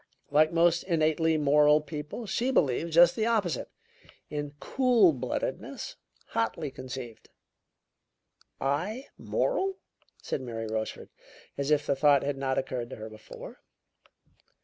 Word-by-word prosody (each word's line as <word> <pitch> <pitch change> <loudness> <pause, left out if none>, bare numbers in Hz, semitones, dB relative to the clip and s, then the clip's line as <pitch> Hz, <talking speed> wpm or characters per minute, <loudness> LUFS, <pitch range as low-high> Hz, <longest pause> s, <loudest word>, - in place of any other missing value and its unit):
Like 155 +2 +5
most 170 0 +3
innately 160 -2 +2
moral 150 0 +5
people, 150 +8 -6
she 235 +5 0
believes 160 - +1
just 175 0 +7
the 220 0 0
opposite 210 -8 0 0.6
in 145 -1 -4
cool 245 -10 +4
bloodedness, 125 -2 -4 0.3
hotly 130 +6 -1
conceived." 130 -3 -8 1.3
"I 180 - -2
moral?" 390 -6 0 0.4
said - - -3
Mary 115 -3 -5
Rochefort, 110 0 -4 0.4
as 140 0 -2
if 150 -1 +3
the 140 - +1
thought 140 0 +4
had 145 0 -1
not 135 -1 -1
occurred 125 -3 -2
to - - -7
her 110 0 -8
before. 110 - -11
150 Hz, 125 wpm, -29 LUFS, 130-170 Hz, 1.3 s, just